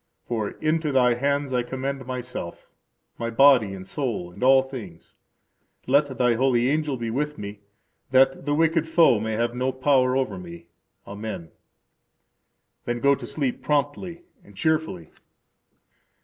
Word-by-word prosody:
For 110 Hz, -4 st, -2 dB
into 155 Hz, -1 st, 0 dB
Thy 125 Hz, -2 st, +4 dB
hands 140 Hz, +2 st, -1 dB
I 125 Hz, -, +2 dB
commend 130 Hz, +1 st, -4 dB
myself, 125 Hz, -9 st, -6 dB, 0.5 s
my 115 Hz, -, -2 dB
body 115 Hz, -5 st, +5 dB
and 95 Hz, 0 st, -10 dB
soul, 110 Hz, -9 st, -3 dB
and 90 Hz, -, -14 dB
all 130 Hz, +1 st, +6 dB
things. 115 Hz, -11 st, -10 dB, 0.7 s
Let 140 Hz, 0 st, +2 dB
Thy 125 Hz, -1 st, +3 dB
holy 125 Hz, 0 st, +2 dB
angel 150 Hz, -3 st, -1 dB
be 115 Hz, -1 st, -4 dB
with 150 Hz, +4 st, -2 dB
me, 100 Hz, 0 st, -7 dB, 0.5 s
that 135 Hz, +1 st, +3 dB
the 145 Hz, 0 st, +1 dB
Wicked 165 Hz, 0 st, +2 dB
Foe 160 Hz, -8 st, +4 dB
may 110 Hz, +1 st, -3 dB
have 120 Hz, +2 st, -1 dB
no 130 Hz, +2 st, -1 dB
power 130 Hz, -1 st, +2 dB
over 110 Hz, -8 st, -2 dB
me. 85 Hz, -1 st, -10 dB, 0.4 s
Amen. 100 Hz, -5 st, -7 dB, 1.3 s
Then 120 Hz, 0 st, -2 dB
go 140 Hz, +3 st, +4 dB
to 130 Hz, -3 st, -5 dB
sleep 135 Hz, -3 st, -2 dB
promptly 150 Hz, +4 st, -2 dB, 0.2 s
and 100 Hz, -, -18 dB
cheerfully. 155 Hz, -, -1 dB
130 Hz, 145 wpm, -24 LUFS, 115-140 Hz, 1.3 s, all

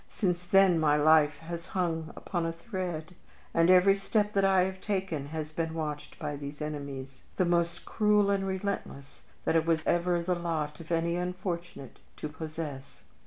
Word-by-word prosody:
Since 180 Hz, -3 st, -1 dB
then 195 Hz, -3 st, +5 dB
my 150 Hz, -2 st, +4 dB
life 150 Hz, -1 st, +5 dB
has 170 Hz, +1 st, -7 dB
hung 165 Hz, -3 st, -1 dB
upon 175 Hz, -3 st, -3 dB
a -, -, -1 dB
thread, 175 Hz, -2 st, -5 dB, 0.4 s
and 165 Hz, +1 st, +4 dB
every 185 Hz, +2 st, +7 dB
step 210 Hz, +1 st, 0 dB
that 195 Hz, -, +2 dB
I 190 Hz, -1 st, +5 dB
have 190 Hz, 0 st, -4 dB
taken 190 Hz, -8 st, -2 dB
has 155 Hz, 0 st, -5 dB
been 160 Hz, 0 st, -2 dB
watched 150 Hz, -2 st, -4 dB
by 145 Hz, -, -4 dB
these 145 Hz, 0 st, -7 dB
enemies, 140 Hz, -3 st, -6 dB
the 185 Hz, -, +2 dB
most 170 Hz, -1 st, 0 dB
cruel 210 Hz, -2 st, +3 dB
and 195 Hz, -1 st, 0 dB
relentless 190 Hz, -7 st, -4 dB, 0.2 s
that -, -, +2 dB
it 165 Hz, 0 st, +3 dB
was 160 Hz, -1 st, +1 dB
ever 175 Hz, 0 st, +2 dB
the 175 Hz, +2 st, 0 dB
lot 160 Hz, -4 st, -2 dB
of 165 Hz, 0 st, -10 dB
any 170 Hz, +1 st, +1 dB
unfortunate 180 Hz, -5 st, -4 dB, 0.2 s
to 155 Hz, -, -4 dB
possess. 155 Hz, -3 st, -7 dB
170 Hz, 170 wpm, -29 LUFS, 155-185 Hz, 0.4 s, every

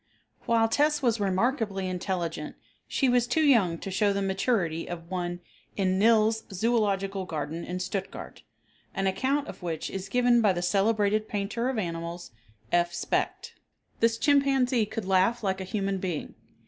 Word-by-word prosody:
While 230 Hz, -1 st, +4 dB
"Tess" 295 Hz, +4 st, +2 dB
was 230 Hz, -3 st, +2 dB
remarkably 200 Hz, 0 st, 0 dB
intelligent 175 Hz, -4 st, -3 dB, 0.3 s
she 270 Hz, -, +1 dB
was 245 Hz, -1 st, +3 dB
too 315 Hz, +5 st, +2 dB
young 215 Hz, -, +4 dB
to 195 Hz, -, -6 dB
show 200 Hz, +2 st, +2 dB
the 200 Hz, 0 st, -1 dB
maturity 190 Hz, -4 st, 0 dB
of 170 Hz, 0 st, -7 dB
one 175 Hz, -1 st, -3 dB, 0.4 s
in 190 Hz, -1 st, +1 dB
Nills' 220 Hz, 0 st, +4 dB
Zoological 195 Hz, -2 st, 0 dB
Garden 160 Hz, 0 st, -4 dB
in 180 Hz, +1 st, -4 dB
Stuttgart, 190 Hz, +1 st, -5 dB, 0.5 s
an 195 Hz, -, -1 dB
account 265 Hz, +9 st, 0 dB
of -, -, -9 dB
which 165 Hz, -3 st, -4 dB
is 195 Hz, 0 st, -5 dB
given 245 Hz, -1 st, +4 dB
by 205 Hz, -4 st, +4 dB
the 175 Hz, 0 st, -3 dB
celebrated 210 Hz, +3 st, +2 dB
painter 215 Hz, +4 st, -2 dB
of 265 Hz, -, -2 dB
animals, 170 Hz, -2 st, -4 dB, 0.4 s
F. 175 Hz, 0 st, +2 dB
Specht. -, -, -2 dB, 0.5 s
This 230 Hz, 0 st, +3 dB
chimpanzee 265 Hz, -3 st, +3 dB
could 220 Hz, -1 st, -5 dB
laugh 195 Hz, +5 st, +2 dB
like 190 Hz, -1 st, -1 dB
a -, -, -4 dB
human 195 Hz, 0 st, -2 dB
being. 180 Hz, -5 st, -4 dB
200 Hz, 155 wpm, -27 LUFS, 185-230 Hz, 0.5 s, While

